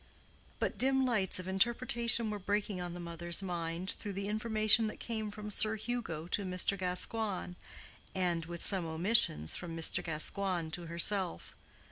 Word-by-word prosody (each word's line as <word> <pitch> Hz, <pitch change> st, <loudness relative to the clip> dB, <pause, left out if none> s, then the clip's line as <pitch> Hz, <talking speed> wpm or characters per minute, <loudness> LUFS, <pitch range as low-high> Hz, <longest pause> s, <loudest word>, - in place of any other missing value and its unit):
But -, -, -2 dB
dim 265 Hz, +1 st, +5 dB
lights 215 Hz, -7 st, +2 dB
of 185 Hz, 0 st, -5 dB
interpretation 235 Hz, +2 st, +1 dB
were 210 Hz, -, -4 dB
breaking 200 Hz, -1 st, -2 dB
on 175 Hz, -1 st, -5 dB
the -, -, -7 dB
mother's 170 Hz, +2 st, -2 dB
mind 175 Hz, 0 st, -3 dB
through 205 Hz, -2 st, -6 dB
the 200 Hz, +1 st, -4 dB
information 215 Hz, +1 st, +4 dB
that 215 Hz, -, -7 dB
came 220 Hz, -2 st, -3 dB
from 210 Hz, 0 st, -7 dB
Sir 215 Hz, +2 st, +1 dB
Hugo 220 Hz, -8 st, -4 dB
to 205 Hz, -, 0 dB
Mr. 185 Hz, +1 st, -1 dB
Gascoigne, 185 Hz, +1 st, +2 dB, 0.6 s
and, 175 Hz, -3 st, -1 dB
with 170 Hz, 0 st, -5 dB
some 190 Hz, -3 st, +3 dB
omissions, 160 Hz, -, +2 dB
from 165 Hz, -2 st, -6 dB
Mr. 165 Hz, -, 0 dB
Gascoigne 170 Hz, +1 st, -2 dB
to 170 Hz, 0 st, -5 dB
herself. 170 Hz, -, 0 dB
190 Hz, 155 wpm, -33 LUFS, 175-215 Hz, 0.6 s, dim